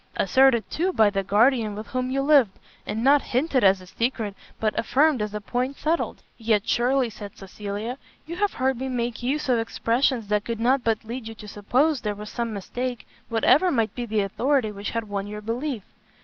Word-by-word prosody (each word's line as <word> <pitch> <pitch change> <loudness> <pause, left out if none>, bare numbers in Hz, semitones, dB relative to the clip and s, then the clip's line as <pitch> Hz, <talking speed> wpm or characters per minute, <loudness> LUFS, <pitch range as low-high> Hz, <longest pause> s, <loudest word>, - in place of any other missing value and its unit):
asserted, 240 +3 +4
too, 360 +4 -1
by 220 - +4
the 195 -1 0
guardian 215 +2 +2
with 215 +1 -6
whom 255 0 -2
you 275 +1 0
lived? 275 -9 +4 0.3
and 220 +2 -2
not 280 +2 +5
hinted 260 +1 0
as 190 -1 +5
a - - -12
secret, 225 +1 -2 0.3
but 215 -1 +1
affirmed 280 +1 +2
as 210 0 -2
a 210 - -4
point 250 +6 -2
settled?" 320 +3 -1 0.2
"Yet 220 -2 +1
surely," 245 0 +2
said 205 -1 -10
Cecilia, 205 +5 -6 0.3
"you 335 - -6
have 410 +1 +1
heard 260 -1 0
me 265 0 -3
make 240 -2 -2
use 280 +5 -1
of 245 -3 +3
expressions 230 +1 0
that 210 -1 +1
could 230 0 -4
not 255 +3 +2
but 225 -1 0
lead 235 +1 -6
you 225 - -7
to 210 - -11
suppose 255 +8 +1
there 210 -1 -2
was 210 +1 -8
some 235 -1 -3
mistake, 245 +4 -4 0.2
whatever 255 +10 +4
might 230 -8 0
be 245 -1 -4
the 215 -1 +1
authority 240 +4 0
which 200 0 -5
had 230 -1 -3
won 200 -1 -3
your 210 0 -6
belief." 230 +2 -3
235 Hz, 205 wpm, -24 LUFS, 210-265 Hz, 0.3 s, not